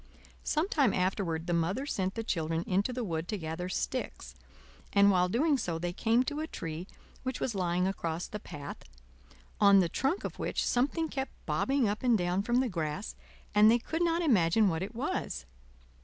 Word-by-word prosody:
Some 310 Hz, +4 st, +1 dB
time 280 Hz, -, +2 dB
afterward 180 Hz, -3 st, 0 dB
the 175 Hz, -, -1 dB
Mother 170 Hz, +11 st, 0 dB
sent 190 Hz, -8 st, -2 dB
the 225 Hz, -, -2 dB
children 165 Hz, -5 st, -1 dB
into 195 Hz, +6 st, +1 dB
the 250 Hz, 0 st, -3 dB
wood 165 Hz, -4 st, -3 dB
to 210 Hz, -, -2 dB
gather 165 Hz, +1 st, -4 dB
sticks; 255 Hz, +6 st, -3 dB, 0.6 s
and 200 Hz, 0 st, +6 dB
while 180 Hz, -1 st, +3 dB
doing 280 Hz, -, +2 dB
so, 170 Hz, -6 st, -2 dB
they 175 Hz, +1 st, -3 dB
came 230 Hz, +6 st, +2 dB
to 290 Hz, +3 st, -3 dB
a 315 Hz, -, -2 dB
tree 165 Hz, -, -6 dB, 0.3 s
which 260 Hz, -1 st, -3 dB
was 245 Hz, -, -1 dB
lying 180 Hz, -2 st, 0 dB
across 170 Hz, -3 st, -2 dB
the 210 Hz, -, -6 dB
path, 145 Hz, -7 st, -8 dB, 0.8 s
on 200 Hz, -1 st, +7 dB
the 180 Hz, -, +3 dB
trunk 275 Hz, -, 0 dB
of -, -, -5 dB
which -, -, -1 dB
something 290 Hz, +6 st, +1 dB
kept 270 Hz, -3 st, -4 dB
bobbing 270 Hz, -3 st, +1 dB
up 205 Hz, +1 st, -2 dB
and 245 Hz, -3 st, +4 dB
down 180 Hz, +1 st, 0 dB
from 240 Hz, +4 st, +2 dB
the 260 Hz, -, 0 dB
grass, 155 Hz, -, -3 dB, 0.4 s
and 210 Hz, +1 st, +7 dB
they 235 Hz, -, +6 dB
could 320 Hz, +7 st, -3 dB
not 340 Hz, 0 st, +2 dB
imagine 210 Hz, -, +4 dB
what 165 Hz, -1 st, -1 dB
it 205 Hz, +5 st, -5 dB
was. 60 Hz, -, -3 dB
200 Hz, 190 wpm, -30 LUFS, 175-255 Hz, 0.8 s, on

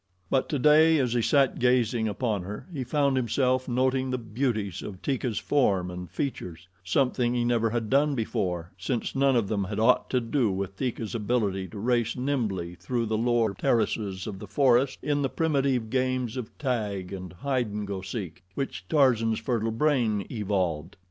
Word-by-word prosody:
But 135 Hz, -, +1 dB
today, 155 Hz, +3 st, +5 dB
as 125 Hz, -4 st, +1 dB
he 120 Hz, -, +2 dB
sat 135 Hz, +3 st, +2 dB
gazing 120 Hz, -2 st, +2 dB
upon 105 Hz, -1 st, -1 dB
her, 100 Hz, +4 st, -7 dB
he 135 Hz, -4 st, -3 dB
found 140 Hz, +1 st, +1 dB
himself 130 Hz, +1 st, +1 dB
noting 130 Hz, +1 st, +1 dB
the 130 Hz, -, -1 dB
beauties 110 Hz, -5 st, -2 dB
of 95 Hz, -3 st, -7 dB
Teeka's 130 Hz, -5 st, -1 dB
form 95 Hz, -11 st, +1 dB
and 90 Hz, -1 st, -7 dB
features 90 Hz, -, -5 dB, 0.2 s
something 125 Hz, +4 st, +1 dB
he 120 Hz, -1 st, +1 dB
never 115 Hz, -1 st, +2 dB
had 115 Hz, -1 st, -2 dB
done 145 Hz, +1 st, +3 dB
before, 95 Hz, -7 st, -2 dB
since 115 Hz, +6 st, -2 dB
none 135 Hz, -1 st, +3 dB
of 115 Hz, -4 st, +2 dB
them 100 Hz, -2 st, -1 dB
had 105 Hz, +2 st, -4 dB
aught 115 Hz, +3 st, +3 dB
to 125 Hz, -, +2 dB
do 120 Hz, 0 st, +1 dB
with 95 Hz, 0 st, -3 dB
Teeka's 115 Hz, -1 st, -3 dB
ability 105 Hz, -4 st, 0 dB
to 95 Hz, -, -10 dB
race 120 Hz, +1 st, +1 dB
nimbly 110 Hz, -10 st, -2 dB
through 115 Hz, +7 st, -2 dB
the 110 Hz, 0 st, -1 dB
lower 115 Hz, -2 st, +2 dB
terraces 105 Hz, -5 st, 0 dB
of 100 Hz, -3 st, -6 dB
the 105 Hz, -, -8 dB
forest 130 Hz, +4 st, +3 dB
in 145 Hz, 0 st, +1 dB
the 135 Hz, -, 0 dB
primitive 135 Hz, -8 st, 0 dB
games 130 Hz, -2 st, 0 dB
of 125 Hz, -4 st, -6 dB
tag 105 Hz, -8 st, -2 dB
and 90 Hz, -2 st, -7 dB
hide 130 Hz, +5 st, -1 dB
and 105 Hz, 0 st, -4 dB
go 100 Hz, -1 st, -4 dB
seek 95 Hz, -3 st, -6 dB
which 105 Hz, -9 st, -4 dB
Tarzan's 115 Hz, -6 st, +3 dB
fertile 115 Hz, -1 st, -1 dB
brain 115 Hz, -5 st, +1 dB
evolved. 95 Hz, -8 st, -1 dB
115 Hz, 175 wpm, -27 LUFS, 100-130 Hz, 0.2 s, today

